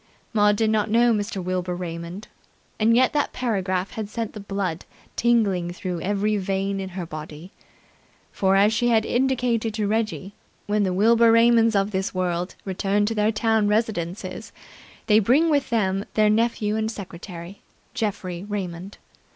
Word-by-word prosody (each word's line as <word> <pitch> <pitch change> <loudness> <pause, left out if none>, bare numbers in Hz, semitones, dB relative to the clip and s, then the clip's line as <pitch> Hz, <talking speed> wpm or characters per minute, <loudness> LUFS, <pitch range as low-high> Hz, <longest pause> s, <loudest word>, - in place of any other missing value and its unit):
Maud 210 -1 +4
did 220 +1 +1
not 215 0 +1
know 235 +2 +4
Mr. 205 -3 -3
Wilbur 180 0 -2
Raymond, 175 +2 -6 0.5
and 225 +1 +4
yet 255 +1 +3
that 295 -1 0
paragraph 190 -6 -1
had 215 -2 -5
sent 225 0 -4
the 215 - -8
blood 195 -4 -3 0.3
tingling 200 -7 +1
through 180 -2 -4
every 205 +3 0
vein 195 0 -2
in 190 -1 -4
her 180 - -3
body. 155 +2 -9 0.8
For 190 0 +1
as 205 +3 +4
she 240 +2 +1
had 225 -2 +3
indicated 245 -4 0
to 215 -2 -1
Reggie, 210 -2 -2 0.3
when 210 0 0
the 190 -2 +1
Wilbur 230 +4 +4
Raymonds 230 -1 +5
of 200 +1 +1
this 190 -1 -2
world 180 0 -2
return 200 +2 0
to 225 - -1
their 210 0 +2
town 220 -1 +1
residences, 205 -1 -2 0.5
they 215 0 +5
bring 275 +10 +3
with 285 -2 +1
them 195 -4 0
their 215 -1 +4
nephew 215 -1 +1
and 220 0 -1
secretary, 180 -3 -9 0.3
Geoffrey 195 -6 -3
Raymond. 190 -2 -5
205 Hz, 160 wpm, -23 LUFS, 185-225 Hz, 0.8 s, Raymonds